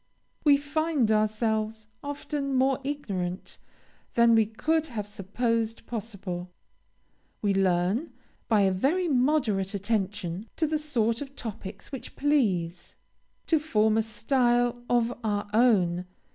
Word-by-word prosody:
We 290 -2 +6
find 295 -4 0
ourselves 215 0 0 0.2
often 285 -1 -3
more 260 0 +3
ignorant 195 -11 -4 0.6
than 235 0 +6
we 220 -2 +4
could 315 +8 0
have 220 -7 -4
supposed 225 +3 -2
possible. 200 -6 -5 0.9
We 200 -1 +3
learn, 195 - +1 0.4
by 215 -3 +4
a 195 -1 +4
very 300 - +1
moderate 245 - +1
attention 200 -2 -2
to 325 - +1
the 310 0 0
sort 235 -6 0
of 280 -1 -7
topics 205 -3 -7
which 270 - -7
please, 195 - 0 0.5
to 320 - +3
form 220 -8 +2
a 225 - +4
style 240 +2 +1
of 240 0 +2
our 205 -1 -1
own. 185 -7 +3
225 Hz, 120 wpm, -27 LUFS, 205-275 Hz, 0.9 s, We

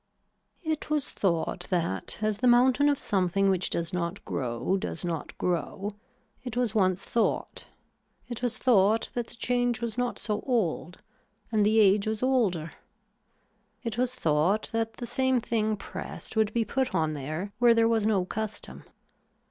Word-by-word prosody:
It 315 -2 -2
was 300 -2 -1
thought 175 -1 -1
that 165 - -1
as 215 -1 0
the 250 - +2
mountain 255 +4 +5
of 285 - +2
something 195 -1 +1
which 185 -1 0
does 170 0 -2
not 180 +2 -3
grow 125 +7 -1
does 185 -2 -4
not 165 -3 -4
grow, 190 +3 -2 0.5
it 245 -2 -5
was 245 -4 +1
once 185 -3 +2
thought, 230 - -1 0.6
it 240 -2 -6
was 245 -1 0
thought 220 -3 +3
that 240 -2 -2
the - - -11
change 245 0 0
was 235 0 -3
not 245 -1 -1
so 210 -2 -2
old 185 -7 -1 0.5
and 215 -2 +3
the 215 +2 +4
age 205 0 +4
was 220 +2 -2
older. 205 -12 +1 1.1
It 230 -2 -3
was 255 0 0
thought 165 +4 +1
that 225 0 -1
the 240 - -6
same 260 +1 +1
thing 220 -2 0
pressed - - -7
would 220 -1 +2
be 230 0 0
put 265 +1 -1
on 155 -1 +1
there 155 +8 -4
where 240 -1 +6
there 225 0 +4
was 225 -2 +2
no 195 -4 +2
custom. 215 +2 -5
215 Hz, 165 wpm, -28 LUFS, 185-240 Hz, 1.1 s, where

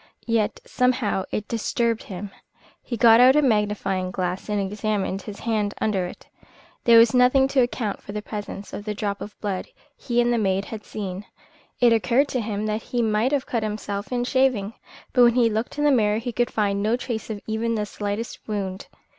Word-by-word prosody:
Yet 230 -3 0
somehow 245 -6 0
it 210 - -3
disturbed 230 0 0
him. 195 0 -7 0.5
He 240 - -5
got 225 +1 +7
out 255 +2 +7
a 300 - +5
magnifying 205 -5 0
glass 185 +1 -3
and 210 -1 0
examined 200 -1 -2
his 205 +1 -9
hand 215 -3 -1
under 195 -4 0
it. - - -12 0.6
There 235 -1 +7
was 230 +1 +6
nothing 255 +2 +5
to 275 - +2
account 240 -4 -2
for - - -9
the 210 0 -5
presence 205 -2 -7
of 205 - -5
the 210 -1 -3
drop 200 -1 -3
of 210 - -9
blood 200 -3 -3 0.3
he 240 -1 -1
and 240 0 +3
the 235 - +1
maid 195 -1 0
had 220 -2 -8
seen. 195 -1 -5 0.5
It 240 -1 +5
occurred 235 +7 +2
to 250 - -1
him 210 -1 -3
that 215 +1 -1
he 240 +1 -2
might 220 +3 +1
have 280 -2 0
cut 230 - -1
himself 210 -1 -4
in 245 -1 0
shaving; 245 -5 +1 0.4
but 250 - +4
when 235 -1 +5
he 235 -3 +4
looked 220 +6 -3
in 295 - 0
the 295 - +5
mirror 215 -5 +3
he 240 +2 -3
could 240 +1 0
find 200 -2 0
no 220 +4 +1
trace 235 -3 -5
of 215 -2 -4
even 225 +1 -1
the 210 -1 -1
slightest 205 +2 -5
wound. 195 -3 -4
215 Hz, 205 wpm, -24 LUFS, 205-240 Hz, 0.6 s, got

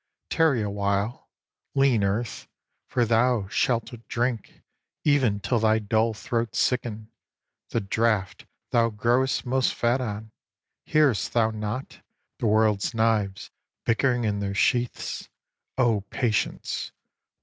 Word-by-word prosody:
Tarry 150 -9 +3
awhile, 100 +2 -2 0.5
lean 135 -6 +3
Earth, 105 +4 -2 0.4
for 120 -2 +1
thou 115 -2 +2
shalt 115 +2 0
drink 120 -2 -2 0.4
Even 130 -9 +3
till 105 +4 0
thy 110 0 +3
dull 110 +1 +1
throat 115 0 -2
sicken, 115 -3 -1 0.6
The 115 - -1
draught 105 -1 0 0.2
thou 115 -1 +3
grow'st 120 +6 +1
most 130 +1 +1
fat 120 +2 +1
on; 110 -2 -5 0.6
hear'st 145 -8 +2
thou 110 -2 +3
not 110 +4 -5 0.4
The 115 - 0
world's 110 0 +2
knives 110 -3 0 0.3
bickering 120 +1 +2
in 105 -2 0
their 100 -1 -3
sheaths? 120 +3 0 0.5
O 120 -5 +3
patience! 115 -5 -1
115 Hz, 115 wpm, -26 LUFS, 105-125 Hz, 0.6 s, Tarry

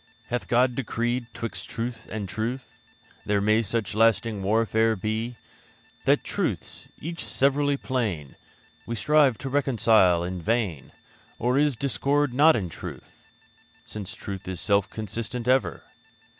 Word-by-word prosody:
Hath 120 0 -2
God 125 +1 +3
decreed 120 0 -1
'twixt 115 0 -6
truth 115 +1 -5
and 105 -3 -4
truth 115 +6 -4 0.4
There 105 -1 +1
may 105 +2 +3
such 110 -1 -2
lasting 115 -1 +2
warfare 110 +2 +2
be, 110 +4 -2 0.7
That - - +4
truths, - - -3
each 165 +2 -5
severally 140 +1 +2
plain, 105 - -2 0.5
We 115 - -2
strive 145 -1 +4
to 135 +1 -5
reconcile 115 -10 +4
in 90 0 -4
vain? 105 - -1 0.5
Or 125 +2 +1
is 145 -2 +3
the - - -15
discord 140 0 +1
not 155 +5 +6
in 95 -6 -1
truth, 85 - -10 0.6
Since 105 -3 -6
truth 95 -2 -7
is 95 -2 -4
self 100 -1 +2
consistent 115 +3 -4
ever? 130 +1 +2
115 Hz, 135 wpm, -26 LUFS, 105-130 Hz, 0.7 s, not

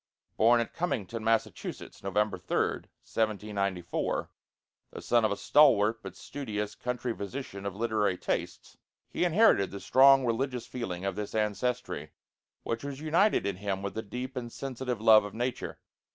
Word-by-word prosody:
Born 120 +2 +5
at 115 - -5
Cummington, 115 - -3
Massachusetts, 115 0 -2
November 100 0 0
3d, 90 - -1 0.2
1794, 100 -4 -2 0.6
the - - -9
son 120 -1 +2
of 110 - +2
a 100 - -1
stalwart 115 -7 +4
but - - -9
studious 105 -7 -5
country 125 -1 -3
physician 100 -2 -6
of 100 - -5
literary 110 -4 0
tastes, - - -4 0.3
he - - -1
inherited 175 - +4
the 100 - -7
strong 135 +2 +6
religious 125 +1 -1
feeling 95 -7 -5
of 100 - -1
this 105 0 -5
ancestry, 110 +4 -2 0.5
which 115 +1 -3
was 140 -1 -5
united 165 - +2
in 100 -2 -2
him 100 -1 -3
with 100 - -4
a 110 - -2
deep 125 +5 -6
and 120 -2 -5
sensitive 125 -3 -4
love 110 -1 +7
of 105 0 -8
nature. 120 +2 -3
115 Hz, 150 wpm, -29 LUFS, 100-125 Hz, 0.6 s, love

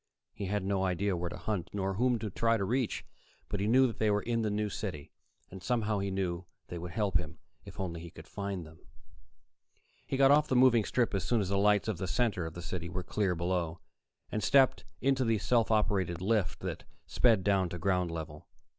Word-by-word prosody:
He 100 - -5
had 105 0 -1
no 95 -1 0
idea 95 +1 0
where 85 0 -3
to - - -7
hunt, 105 -6 -3
nor 95 -1 -1
whom 120 +4 +2
to 110 -2 -5
try 115 +4 +2
to 100 - -1
reach, 125 +3 -1 0.4
but 105 - -2
he 100 - 0
knew 125 +4 +5
they 110 0 0
were 105 0 +1
there 120 - -1
in 115 - +1
the 110 - 0
New 105 +1 0
City, 95 -8 -5 0.4
and 95 0 -9
somehow 110 0 0
he 100 0 -2
knew 90 -2 -2 0.2
they 85 - -5
would 90 +1 -6
help 95 -1 +1
him, 85 -1 -8 0.3
if - - -11
only 85 -3 -3
he 85 - -8
could - - -13
find 100 -4 -4
them. 80 +1 -15 1.3
He 135 - -1
got 135 0 +6
off 150 +1 +5
the 130 - 0
moving 125 -4 +5
strip 120 -4 0
as 95 -2 0
soon 120 +3 +1
as 100 -3 -1
the 100 - 0
lights 105 +1 +3
of 105 -6 -2
the 95 - -2
center 95 -2 0
of 80 - -9
the 85 - -7
city 85 -1 -4
were 90 +1 -4
clear 95 0 0
below, 85 -1 -1 0.5
and 110 - -1
stepped 135 +1 +4 0.2
into 135 0 +2
the 115 -2 +2
self 115 +1 +2
operated 100 -6 +1
lift 95 -6 0
that - - -4 0.2
sped 115 -6 +3
down 95 -3 +2
to 90 - -5
ground 90 0 +1
level. 80 -2 -7
100 Hz, 225 wpm, -31 LUFS, 90-110 Hz, 1.3 s, got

